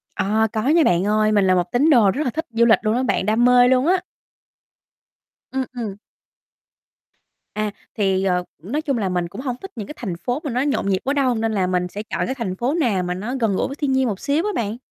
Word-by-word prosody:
À, 220 Hz, +3 st, +1 dB
có 215 Hz, -, 0 dB
nha 330 Hz, +1 st, +5 dB
bạn 175 Hz, -6 st, +2 dB
ơi. 215 Hz, 0 st, +2 dB
Mình 205 Hz, -2 st, +3 dB
là 185 Hz, -, +4 dB
một 175 Hz, -1 st, -1 dB
tín 275 Hz, +6 st, +3 dB
đồ 230 Hz, -9 st, +5 dB
rất 285 Hz, +9 st, -2 dB
là 255 Hz, -, 0 dB
thích 320 Hz, +2 st, -4 dB
du 230 Hz, +1 st, +3 dB
lịch 225 Hz, -, +5 dB
luôn 215 Hz, +1 st, 0 dB
á 255 Hz, -, 0 dB
bạn, 230 Hz, -, 0 dB
đam 220 Hz, +4 st, +2 dB
mê 245 Hz, 0 st, +6 dB
luôn 260 Hz, +3 st, +3 dB
á. 365 Hz, +1 st, +3 dB, 1.5 s
Ừm, 265 Hz, 0 st, -1 dB
ừm. 220 Hz, -5 st, -4 dB, 1.6 s
À, 215 Hz, -1 st, -2 dB, 0.3 s
thì, 195 Hz, -2 st, +1 dB
ờ, 180 Hz, -2 st, +1 dB, 0.2 s
nói 265 Hz, -, -2 dB
chung 275 Hz, -5 st, -1 dB
là 200 Hz, -4 st, -1 dB
mình 180 Hz, -1 st, -1 dB
cũng 205 Hz, -, -8 dB
hông 255 Hz, -3 st, -3 dB
thích 385 Hz, -, -8 dB
những 210 Hz, -3 st, -6 dB
cái -, -, -7 dB
thành 190 Hz, -8 st, -4 dB
phố 245 Hz, +9 st, -2 dB
mà 285 Hz, -, -3 dB
nó 250 Hz, +2 st, 0 dB
nhộn 280 Hz, -8 st, 0 dB
nhịp 190 Hz, -1 st, +1 dB
quá 275 Hz, -, 0 dB
đâu, 265 Hz, -4 st, +1 dB
nên 225 Hz, 0 st, -1 dB
là 190 Hz, -3 st, +1 dB
mình 180 Hz, -1 st, 0 dB
sẽ 205 Hz, +4 st, -7 dB
chọn -, -, -3 dB
cái 260 Hz, -, -3 dB
thành 220 Hz, -8 st, -3 dB
phố 245 Hz, +8 st, -1 dB
nào 235 Hz, -, +1 dB
mà 180 Hz, 0 st, -2 dB
nó 210 Hz, +8 st, -4 dB
gần 220 Hz, -5 st, +1 dB
gũi -, -, 0 dB
với 275 Hz, -, -6 dB
thiên 290 Hz, -3 st, -1 dB
nhiên 265 Hz, -1 st, +2 dB
một 200 Hz, -4 st, -3 dB
xíu 295 Hz, +5 st, 0 dB
á 420 Hz, -, 0 dB
bạn. 220 Hz, 0 st, -2 dB
225 Hz, 260 wpm, -21 LUFS, 195-265 Hz, 1.6 s, mê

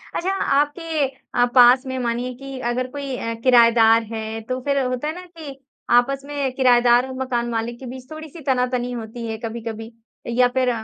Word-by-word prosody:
अच्छा, 375 Hz, +3 st, -1 dB
आपके 295 Hz, +2 st, 0 dB
अ, 250 Hz, -2 st, -1 dB
पास 250 Hz, +2 st, +7 dB
में 260 Hz, 0 st, -4 dB
मानिए 245 Hz, +1 st, -2 dB
कि 270 Hz, -1 st, -7 dB
अगर 255 Hz, +1 st, -2 dB
कोई 280 Hz, -2 st, -5 dB
अ, 230 Hz, -, -3 dB
किरायेदार 230 Hz, -2 st, +5 dB
है, 220 Hz, 0 st, -5 dB
तो 255 Hz, +3 st, -4 dB
फिर 280 Hz, -1 st, +1 dB
होता 255 Hz, +3 st, -2 dB
है 310 Hz, -, -2 dB
ना 365 Hz, 0 st, -9 dB
कि 320 Hz, -6 st, -10 dB, 0.3 s
आपस 270 Hz, +3 st, +3 dB
में 285 Hz, -2 st, -2 dB
किरायेदार 245 Hz, -1 st, +4 dB
और 260 Hz, -, -7 dB
मकान 240 Hz, -2 st, -1 dB
मालिक 235 Hz, +1 st, -3 dB
के 265 Hz, -, -9 dB
बीच 255 Hz, +1 st, -9 dB
थोड़ी-सी 310 Hz, +1 st, -9 dB
तना-तनी 250 Hz, -2 st, 0 dB
होती 230 Hz, 0 st, -6 dB
है 220 Hz, 0 st, -4 dB
कभी-कभी, 225 Hz, 0 st, -6 dB, 0.4 s
या 245 Hz, +1 st, +3 dB
फिर 255 Hz, -1 st, +3 dB
250 Hz, 185 wpm, -21 LUFS, 235-275 Hz, 0.4 s, पास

